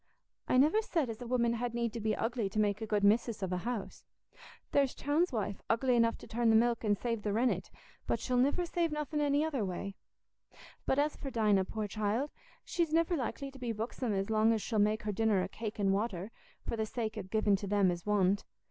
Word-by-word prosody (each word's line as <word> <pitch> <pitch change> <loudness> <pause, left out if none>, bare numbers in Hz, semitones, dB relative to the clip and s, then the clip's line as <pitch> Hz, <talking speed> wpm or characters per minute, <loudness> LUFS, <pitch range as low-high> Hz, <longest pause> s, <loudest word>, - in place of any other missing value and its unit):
"I - - +3
niver 310 +11 +5
said 320 - -1
as 225 +2 -9
a 245 - -6
woman 235 -1 +2
had 235 0 -3
need 235 -2 -1
to 235 - -4
be 215 -1 0
ugly 225 -3 -1
to 215 - -2
make 210 0 +1
a 220 - -3
good 210 -1 +1
missis 220 +1 +3
of 185 -1 -1
a - - 0
house. 225 +2 -4 0.7
There's 275 -2 +2
Chowne's 300 +5 +1
wife 205 -4 -3
ugly 245 +2 +2
enough 230 -1 +3
to - - -12
turn 235 0 +1
the 220 - +5
milk 235 +1 +3
an' 210 -2 +3
save 230 +1 -2
the 205 - -1
rennet, 235 +4 +1 0.4
but - - +1
she'll 250 -1 -1
niver 285 +8 +2
save 340 -1 0
nothing 300 0 -2
any 290 +1 +2
other 280 -8 -1
way. 195 +1 -4 0.9
But 265 - +2
as 295 +1 +1
for 275 - -6
Dinah, 210 -6 +2
poor 215 +1 -3
child, 215 +7 -1 0.3
she's 335 -3 0
niver 330 +2 +2
likely 275 0 -3
to 270 - -13
be 245 -2 -2
buxom 225 +2 -3
as 195 +1 -1
long 220 +1 +4
as 220 - -1
she'll 220 -3 -1
make 210 +1 +2
her 210 - -1
dinner 215 -1 +2
o' - - -2
cake 215 +3 -6
and 195 -2 +2
water, 200 -1 -2 0.4
for - - -1
the 220 -1 -2
sake 220 -1 -3
o' 215 - -3
giving 205 +1 +2
to 200 - -6
them 200 -2 +3
as 175 -1 -5
want. 200 -1 +2
225 Hz, 230 wpm, -32 LUFS, 210-255 Hz, 0.9 s, niver